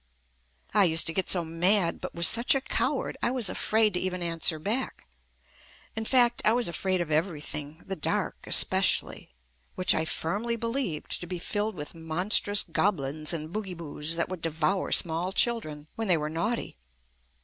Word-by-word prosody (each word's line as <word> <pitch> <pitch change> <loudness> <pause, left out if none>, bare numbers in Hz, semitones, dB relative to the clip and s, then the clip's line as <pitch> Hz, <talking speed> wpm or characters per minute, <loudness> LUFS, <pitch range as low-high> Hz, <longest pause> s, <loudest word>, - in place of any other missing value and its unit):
I 205 -1 +6
used 165 -1 +3
to 160 - -1
get 190 - -1
so 175 -3 +3
mad, 170 +2 +1
but - - -6
was 170 -1 +5
such 235 +4 +4
a 270 - 0
coward - - -2
I - - +1
was 245 -6 0
afraid 215 +1 +1
to 180 - -1
even 180 -1 -3
an 165 -1 -3
swer 160 0 +2
back. 240 +6 -2 0.9
In 220 0 -4
fact 240 -1 +4
I 215 - +4
was 240 0 +1
afraid 185 +2 -1
of 165 -2 -4
everything, 150 -2 -3
the 195 - -4
dark 155 - -1
especially, - - +3 0.5
which 185 - +3
I 160 - 0
firmly 205 +10 -2
believed 230 - -3
to 175 - -7
be 180 0 -4
filled 205 +4 -2
with 150 -3 -7
monstrous 180 +5 +1
goblins 155 -5 -1
and 160 0 -4
boogyboos 175 -8 -6
JUST 160 - 0
ME - - -4
that 170 - -1
would 185 -3 -6
devour 165 +4 -1
small 170 +2 +2
children 190 -10 0
when 225 -1 -4
they 180 -3 +4
were 150 0 -3
naughty. 190 - -3
180 Hz, 180 wpm, -27 LUFS, 160-215 Hz, 0.9 s, I